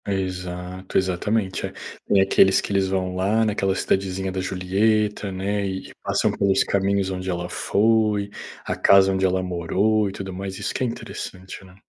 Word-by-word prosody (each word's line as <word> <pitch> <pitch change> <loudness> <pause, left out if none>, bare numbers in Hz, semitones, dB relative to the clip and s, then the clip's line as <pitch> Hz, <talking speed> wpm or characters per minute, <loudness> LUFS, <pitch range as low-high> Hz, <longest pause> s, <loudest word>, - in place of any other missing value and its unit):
Exato, 90 -1 -3
exatamente. 95 +2 0
É, - - -10 0.4
tem 100 - +4
aqueles 95 0 +5
que - - -5
eles 95 -1 +2
vão 95 -1 -1
lá 105 +5 +2
naquela 100 -3 0
cidadezinha 95 0 -1
da 95 - -3
Julieta, 100 +3 0
né, 100 +2 -2
e 95 0 -5
passam - - +1
pelos 100 -1 +2
caminhos 100 0 0
onde 95 0 -4
ela 85 -1 -2
foi, 105 +1 +1 0.3
a - - -2
casa 95 0 +5
onde 95 0 +1
ela 95 0 0
morou 95 +4 +1
e - - -6
tudo 95 -1 -6
mais. 95 +1 -5
Isso 105 - -3
que - - -2
é - - +1
interessante, 100 -4 -7
né. 90 -1 -16
95 Hz, 170 wpm, -23 LUFS, 95-100 Hz, 0.4 s, aqueles